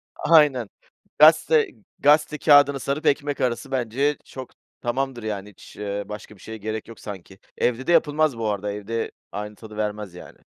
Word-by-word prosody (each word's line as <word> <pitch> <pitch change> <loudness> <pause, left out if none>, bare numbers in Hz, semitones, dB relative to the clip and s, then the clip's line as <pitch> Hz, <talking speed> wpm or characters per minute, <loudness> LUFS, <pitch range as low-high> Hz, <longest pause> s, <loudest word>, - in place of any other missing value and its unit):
Aynen, 150 -8 +4 0.5
gazete 155 0 +6 0.3
gazete 150 +1 +3
kâğıdını 145 -2 +5
sarıp 140 +5 -3
ekmek 145 -1 +1
arası 125 +2 -1
bence 135 +3 0
çok 130 -1 -9 0.3
tamamdır 125 0 -2
yani, 105 -2 -4
hiç, 105 - -16
ııı, 100 0 -4
başka 105 0 -8
bir 95 - -20
şeye 110 0 -8
gerek 110 +1 -5
yok 115 - -12
sanki. 95 -2 -10 0.2
Evde 125 +4 0
de - - +2
yapılmaz 155 -5 +2
bu 115 - -2
arada, 105 0 -2
evde 105 +3 -4 0.2
aynı 105 +1 -6
tadı 110 0 -12
vermez 105 -3 -3
yani. 90 - -12
120 Hz, 165 wpm, -23 LUFS, 105-145 Hz, 0.5 s, gazete